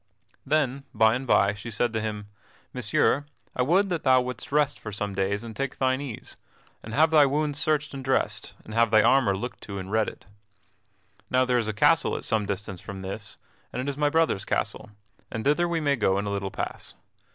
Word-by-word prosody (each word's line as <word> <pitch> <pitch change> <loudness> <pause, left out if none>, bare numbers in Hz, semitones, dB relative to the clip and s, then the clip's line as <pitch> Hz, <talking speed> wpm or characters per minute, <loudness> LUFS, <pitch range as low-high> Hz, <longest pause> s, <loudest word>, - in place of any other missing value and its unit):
Then 140 -2 +1
by 110 0 +5
and 130 +2 -3
by 100 -3 +4
she 105 +3 -8
said 115 +2 0
to 110 - -1
him: 105 -1 -4 0.5
"Messire, 125 +4 +1 0.3
I - - 0
would 185 +9 +3
that 170 -4 -1
thou 130 -1 +5
wouldst 125 -1 -5
rest 145 -1 +2
for 105 - -7
some 105 0 -3
days, 100 +2 -1
and 115 -2 -8
take 135 -1 -3
thine 130 0 +1
ease, 130 -6 -7 0.4
and 110 +1 -7
have 160 +2 +4
thy 150 -3 +6
wounds 145 +1 0
searched 150 -1 0
and 135 -1 -6
dressed, 135 0 -1
and 110 - -9
have 115 0 +3
thy 110 0 +5
armor 115 -8 +4
looked 120 +5 -6
to 100 -1 -7
and 95 0 -6
redded. 110 -6 -1 1.0
Now 130 0 +3
there 125 -1 +2
is 115 - -2
a - - 0
castle 105 - +3
at - - -7
some 110 -2 0
distance 100 -2 -4
from 95 -1 -8
this, 100 +2 -6 0.3
and - - -5
it 130 - -3
is 140 - -2
my 145 +1 +2
brother's 160 -10 +1
castle, - - -2 0.4
and 115 - -4
thither 150 +5 +2
we 170 -1 0
may 145 -2 +2
go 95 -4 +2
in 100 - -1
a 100 - -2
little 100 -1 -2
pass. - - -5
120 Hz, 215 wpm, -26 LUFS, 105-140 Hz, 1.0 s, thy